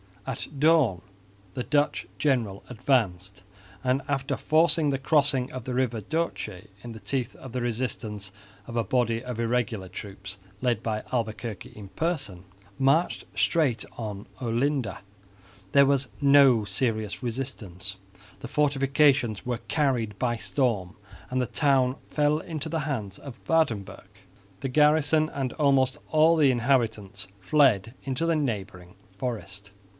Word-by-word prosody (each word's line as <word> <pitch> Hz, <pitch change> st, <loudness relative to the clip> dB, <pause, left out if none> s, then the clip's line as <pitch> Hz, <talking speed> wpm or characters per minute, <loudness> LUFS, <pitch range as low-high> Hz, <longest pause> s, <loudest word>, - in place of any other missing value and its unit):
At 135 Hz, -3 st, -4 dB
dawn 145 Hz, -, +4 dB, 0.5 s
the 125 Hz, -, -2 dB
Dutch 145 Hz, +3 st, +1 dB
general 120 Hz, -9 st, 0 dB
advanced 100 Hz, -7 st, 0 dB, 0.4 s
and, 130 Hz, +1 st, +2 dB
after 135 Hz, 0 st, -1 dB
forcing 160 Hz, -1 st, +3 dB
the 135 Hz, -, +1 dB
crossing 135 Hz, -2 st, +2 dB
of 130 Hz, -2 st, -7 dB
the 130 Hz, -, -3 dB
river 125 Hz, -3 st, 0 dB
Doce 110 Hz, -, -3 dB, 0.2 s
in 120 Hz, -1 st, -7 dB
the 110 Hz, -, -9 dB
teeth 120 Hz, +4 st, -2 dB
of 130 Hz, -, -10 dB
the 125 Hz, +1 st, -2 dB
resistance 110 Hz, -4 st, -3 dB, 0.4 s
of 115 Hz, -, -7 dB
a 115 Hz, -, +2 dB
body 115 Hz, +1 st, 0 dB
of 125 Hz, -2 st, -5 dB
irregular 115 Hz, -4 st, -1 dB
troops 100 Hz, 0 st, -8 dB, 0.2 s
led 120 Hz, -4 st, +1 dB
by 110 Hz, -1 st, -2 dB
Albuquerque 115 Hz, -3 st, -3 dB
in 100 Hz, -2 st, -10 dB
person, 140 Hz, -, -3 dB, 0.3 s
marched 140 Hz, +6 st, +2 dB
straight 145 Hz, -9 st, +2 dB
on 105 Hz, -2 st, -5 dB, 0.2 s
Olinda. 125 Hz, -2 st, 0 dB, 0.7 s
There 140 Hz, 0 st, +6 dB
was 135 Hz, -1 st, +2 dB
no 140 Hz, -6 st, +6 dB
serious 110 Hz, 0 st, -2 dB
resistance. 110 Hz, -7 st, -5 dB, 0.4 s
The -, -, -7 dB
fortifications 135 Hz, -4 st, +2 dB
were 120 Hz, -2 st, -2 dB
carried 125 Hz, -9 st, 0 dB
by 120 Hz, 0 st, 0 dB
storm 110 Hz, -8 st, -1 dB, 0.3 s
and 130 Hz, -, -1 dB
the 125 Hz, -, -1 dB
town 135 Hz, -3 st, +2 dB
fell 150 Hz, 0 st, +2 dB
into 160 Hz, -2 st, -5 dB
the 160 Hz, -1 st, -1 dB
hands 110 Hz, -10 st, -4 dB
of 130 Hz, -4 st, -10 dB
Waerdenburgh. 110 Hz, -, 0 dB, 0.5 s
The 135 Hz, -, -2 dB
garrison 150 Hz, +2 st, +4 dB
and 135 Hz, -4 st, -3 dB
almost 135 Hz, -2 st, +3 dB
all 160 Hz, +2 st, +5 dB
the 145 Hz, -4 st, +5 dB
inhabitants 115 Hz, -6 st, 0 dB
fled 115 Hz, -1 st, +3 dB
into 135 Hz, +4 st, -2 dB
the 165 Hz, -1 st, +2 dB
neighbouring 100 Hz, -, -3 dB, 0.2 s
forest. 100 Hz, -4 st, -5 dB
125 Hz, 135 wpm, -27 LUFS, 110-140 Hz, 0.7 s, There